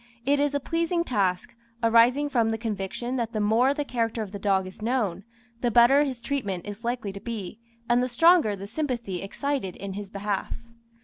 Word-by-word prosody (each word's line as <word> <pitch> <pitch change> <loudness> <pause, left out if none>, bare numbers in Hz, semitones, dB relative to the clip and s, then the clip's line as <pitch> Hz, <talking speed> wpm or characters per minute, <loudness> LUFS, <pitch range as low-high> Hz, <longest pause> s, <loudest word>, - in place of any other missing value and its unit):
It 285 +1 +3
is 285 0 +1
a - - +2
pleasing 335 +4 0
task, 195 - -1 0.3
arising 235 +5 +5
from 235 -5 +2
the 225 - -1
conviction 225 +3 -3
that 230 -1 -2
the 215 - -1
more 225 +6 +3
the 290 +1 -2
character 230 -3 -1
of 200 - -9
the 200 - -6
dog 195 -1 +1
is 185 +3 -11
known, 215 -6 -1 0.4
the 245 - +2
better 245 +6 +6
his 260 -4 -5
treatment 205 -12 -3
is 205 +2 -8
likely 235 -4 -2
to 200 - -7
be, 225 -4 -6 0.3
and 240 +1 +3
the 255 - -1
stronger 325 - +5
the 195 0 -8
sympathy 235 - -3
excited 260 -1 -3
in 195 0 -6
his 200 0 -6
behalf. 200 0 -3
230 Hz, 195 wpm, -26 LUFS, 200-260 Hz, 0.4 s, better